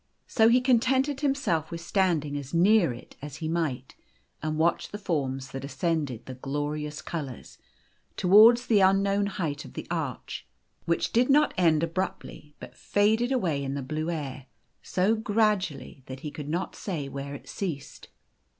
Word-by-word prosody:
So 225 -1 +4
he 250 +2 +5
contented 260 +3 +2
himself 270 - 0
with 170 - -5
stand 170 -3 +1
ing 145 0 -5
as 145 +2 -5
near 185 - +5
it 120 +1 -11
as 145 -1 -7
he 160 0 -4
might, 155 -6 -2 0.5
and 155 0 -2
watching 165 +2 +1
the 205 - -5
forms 135 -9 -2
that 135 0 -6
ascended 140 -3 -2
the 130 - -7
glorious 145 +3 -4
colours 140 -7 -6 0.6
towards 220 +6 +7
the 215 -3 +4
unknown 195 +1 +3
o - - -5
height 150 -6 -3
of - - -12
the - - -6
arch, - - -4 0.4
which 170 - 0
did 245 +3 +3
not 295 +2 +4
end 165 -3 +3
abruptly, 165 -3 -4
but - - -11
faded 220 +5 +1
away 170 - 0
in 135 0 -3
the 140 - -3
blue 155 +5 -3
air, 140 -5 -5 0.3
so 190 +4 +1
gradually 210 - 0
that 130 0 -8
he 150 - -5
could 145 -1 -7
not 175 +4 -2
say 160 -8 -4
where 140 +1 -6
it - - -12
ceased. 165 -8 -5
165 Hz, 170 wpm, -27 LUFS, 145-205 Hz, 0.6 s, towards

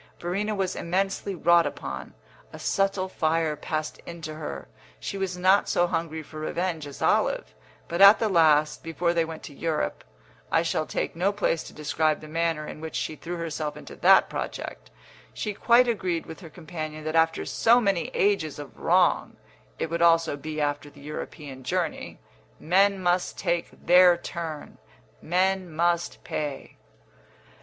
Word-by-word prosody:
Verena 200 +5 -2
was 190 -2 -1
immensely 195 +2 -1
wrought 170 0 +4
upon; - - -7 0.4
a - - -9
subtle 195 -1 0
fire 160 -3 0
passed 155 +1 -4
into 165 -2 -7
her; 110 - -6 0.3
she - - -5
was 190 -2 -3
not 185 +3 +4
so 175 - +3
hungry 165 -2 -3
for 155 +1 -10
revenge 165 -1 -2
as 140 - -7
Olive, - - +1 0.3
but 170 +3 -2
at 200 +2 +10
the 225 - 0
last, 155 -5 +3
before 170 +1 -1
they 170 -1 +2
went 160 -1 -7
to 145 - -9
Europe 160 +2 -2 0.5
(I 165 - +3
shall 160 -2 -1
take - - -3
no 185 +4 +1
place 200 -5 0
to - - -11
describe 155 0 0
the 155 - -11
manner 165 -1 -1
in 155 - -8
which 160 -1 -6
she 155 - -2
threw 175 +3 -6
herself 155 -2 -4
into - - -10
that - - +6
project), - - -6 0.5
she 210 - -3
quite 240 +4 +4
agreed 185 -7 -1
with 160 - -9
her 170 -4 -11
companion 155 -1 -7
that 155 +1 -3
after 165 0 +2
so 235 +2 +4
many 195 -7 +1
ages 195 -7 +1
of 145 -2 -10
wrong - - +2 0.4
(it 165 - -3
would 170 0 -1
also 165 -2 +4
be 155 +2 -6
after 145 -1 -1
the 145 -1 -17
European 145 -2 -7
journey) 175 +4 -2 0.4
men 195 +4 +3
must 180 0 0
take 170 0 -1 0.2
their 180 0 +7
turn, 165 -3 -7 0.4
men 185 +2 +1
must 170 +2 0
pay! 145 -3 -5
165 Hz, 165 wpm, -26 LUFS, 155-185 Hz, 0.5 s, at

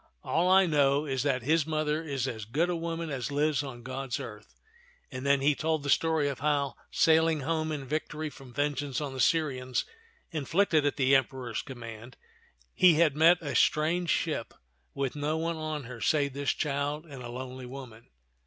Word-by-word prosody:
"All 175 +2 +1
I 190 +1 +6
know 145 -2 +2
is 135 -3 -1
that 130 -3 0
his 155 +3 +2
mother 155 0 0
is 135 -4 -2
as 110 -4 -5
good 160 +11 0
a - - -1
woman 165 -1 -3
as 130 -2 -3
lives 145 0 +1
on 130 -4 -8
God's 130 0 -4
earth 105 -1 -9 0.3
"; 485 0 -32
and 130 +1 -5
then 140 -1 +4
he 145 +2 +4
told 155 0 -1
the 140 - 0
story 160 -3 +2
of 140 -2 -3
how, 140 -2 +1 0.2
sailing 160 -2 +3
home 155 +2 -1
in 145 -3 -4
victory 155 +2 -3
from 135 -3 -13
vengeance 145 -1 -1
on 145 -3 -4
the 130 - -6
Syrians, 130 -4 +1 0.5
inflicted 160 0 +2
at 145 - 0
the 135 0 +4
Emperor's 130 -3 -1
command, 115 -2 -9 0.6
he 180 -3 +6
had 155 -3 +3
met 165 +3 +6
a 140 -3 -3
strange 165 +6 +2
ship - - -1 0.4
with 140 -1 -2
no 150 +2 -1
one 165 +1 -2
on 155 -2 -4
her 120 -1 -9
save 140 -3 +2
this 140 0 -2
child 145 +1 -1
and 140 -5 -10
a 120 - -7
lonely 130 +1 -7
woman. 125 -3 -10
145 Hz, 190 wpm, -29 LUFS, 130-155 Hz, 0.6 s, I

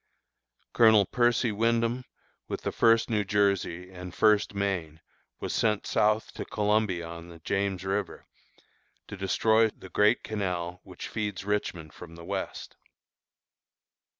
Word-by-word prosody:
Colonel 110 -3 +6
Percy 120 +1 +2
Wyndham, 115 +3 0 0.4
with - - -4
the - - -2
First 115 0 +4
New 110 -3 +1
Jersey 100 -3 0
and 90 -1 -9
First 105 -2 +3
Maine, 90 -6 -2 0.4
was - - -4
sent 105 -2 +1
south 105 +1 +1
to - - -5
Columbia 105 -4 0
on 85 0 -9
the 85 - -11
James 95 +2 -2
River, 95 -1 -3 0.8
to - - -6
destroy 110 +3 +3
the 95 - -14
great 105 +6 +3
canal 90 -4 -3
which - - -8
feeds 105 -3 -4
Richmond 90 -6 -2
from 85 -2 -11
the 85 0 -11
west. - - -5
100 Hz, 130 wpm, -28 LUFS, 90-110 Hz, 0.8 s, Colonel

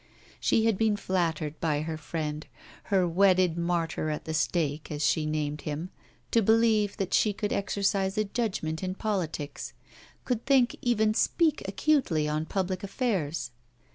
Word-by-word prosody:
She 220 - +2
had 225 -4 +2
been 220 -2 +2
flattered 165 -6 -1
by 150 -3 0
her 160 +1 -3
friend, 155 -1 -4 0.4
her 190 -3 +2
'wedded 185 -1 +3
martyr 170 -2 -1
at 150 - -4
the 160 - -3
stake,' 155 -1 0
as 150 -1 -1
she 155 -1 +2
named 150 -1 -2
him, 155 +5 -4 0.4
to 230 - +4
believe 220 -1 +3
that 195 -3 -2
she 210 - +3
could 205 +1 -2
exercise 195 0 0
a 215 - +3
judgement 195 -7 -2
in 185 0 -3
politics 165 -9 -3 0.5
could 245 -3 -1
think, 265 -3 +4
even 220 -3 +2
speak 320 +6 +2
acutely, 195 - +1
on 155 +1 -1
public 185 0 -2
affairs. 170 - -2
185 Hz, 150 wpm, -28 LUFS, 155-210 Hz, 0.5 s, to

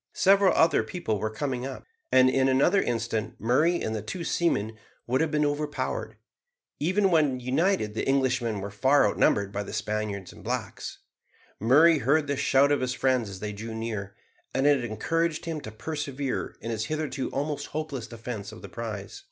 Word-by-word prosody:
Several 195 0 +5
other 165 +1 +4
people 110 - -3
were 110 - -1
coming 125 +2 -3
up, 135 +1 -6 0.3
and 130 0 +6
in 130 0 +3
another 145 +9 +4
instant 115 -2 -2
Murray 155 +10 +2
and 110 - -2
the 110 - -3
two 110 - -5
seamen 110 -12 0 0.3
would 130 +4 +1
have 160 - +1
been 150 -1 +1
overpowered. 145 0 -2 0.6
Even 190 +5 +2
when 150 -6 +3
united 130 - +1
the - - -3
Englishmen 125 -6 +1
were 100 +1 -5
far 130 +5 +4
outnumbered 100 -1 +2
by 100 - -2
the 100 - -7
Spaniards 105 -3 -3
and - - -14
blacks. - - -4 0.6
Murray 150 +8 +5
heard 145 +5 +2
the 140 0 -1
shout 140 +1 +3
of 145 - +2
his 125 0 -1
friends 130 -5 +1
as 95 -1 -9
they 105 0 -3
drew 110 +2 -6
near, 110 -3 -4 0.4
and 135 - +2
it 145 -3 +4
encouraged 165 +8 -1
him 160 -2 -3
to 110 - -8
persevere 140 +2 -4
in 115 - -4
his 110 -1 -2
hitherto 155 -4 -3
almost 145 +1 -3
hopeless 150 -7 -4
defence 110 -3 -6
of 110 - -12
the - - -8
prize. 110 -4 -6
130 Hz, 180 wpm, -27 LUFS, 110-150 Hz, 0.6 s, and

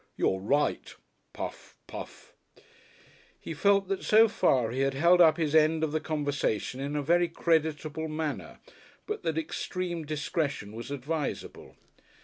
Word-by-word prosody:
"You're 95 - +1
right, 140 +10 0 0.4
puff, - - -7
puff." - - -10 1.1
He - - -6
felt 200 +4 +3
that 195 - -1
so 220 +1 +6
far 125 - +2
he 130 - -3
had 135 0 +1
held 170 +5 +5
up 160 -2 +6
his 155 -3 -1
end 160 0 +4
of 155 - 0
the 155 - 0
conversation 145 -6 -2
in 140 +2 -3
a 145 - -1
very 175 +4 +3
creditable 160 -2 0
manner, 155 -1 -4 0.5
but 425 0 -4
that 160 -1 -2
extreme 175 +1 -3
discretion 150 -6 -2
was 115 +3 -7
advisable. 145 +2 -4
155 Hz, 140 wpm, -29 LUFS, 145-165 Hz, 1.1 s, so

